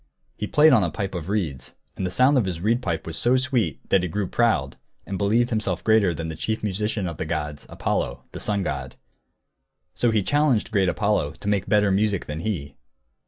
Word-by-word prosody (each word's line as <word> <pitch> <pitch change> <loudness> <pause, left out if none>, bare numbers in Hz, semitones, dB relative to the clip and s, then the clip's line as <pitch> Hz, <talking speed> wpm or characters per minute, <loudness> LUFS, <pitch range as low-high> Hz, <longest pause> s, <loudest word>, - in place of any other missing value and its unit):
He 105 - -4
played 150 +4 +5
on 110 -6 +5
a 85 - 0
pipe 95 +2 -4
of 90 -1 -5
reeds. 85 -11 -3 0.2
And 95 - -2
the - - -2
sound 130 +9 +4
of 125 -6 +3
his 90 -3 -3
reed 115 +7 +1
pipe 85 -8 -2
was 80 - -5
so 125 +2 +3
sweet 125 - -1
that 95 - +4
he 90 - -2
grew 100 +4 -1
proud, 100 - +1 0.3
and 100 - -4
believed 110 +6 +2
himself 95 -6 -1
greater 110 -3 +4
than 80 0 -4
the 80 - -5
chief 110 +8 -3
musician 105 0 -1
of 85 -3 -5
the - - -3
gods, 75 -3 -4
Apollo, - - -2
the - - -7
sun 100 -2 0
god. 65 -5 -4 1.0
So 120 - +1
he 110 -3 +2
challenged 145 -4 +2
great 95 -4 +2
Apollo 100 -7 0
to 90 - -10
make 100 -2 0
better 105 -2 +3
music 100 -1 +1
than 75 +1 -5
he. 85 -7 -4
100 Hz, 210 wpm, -24 LUFS, 85-110 Hz, 1.0 s, played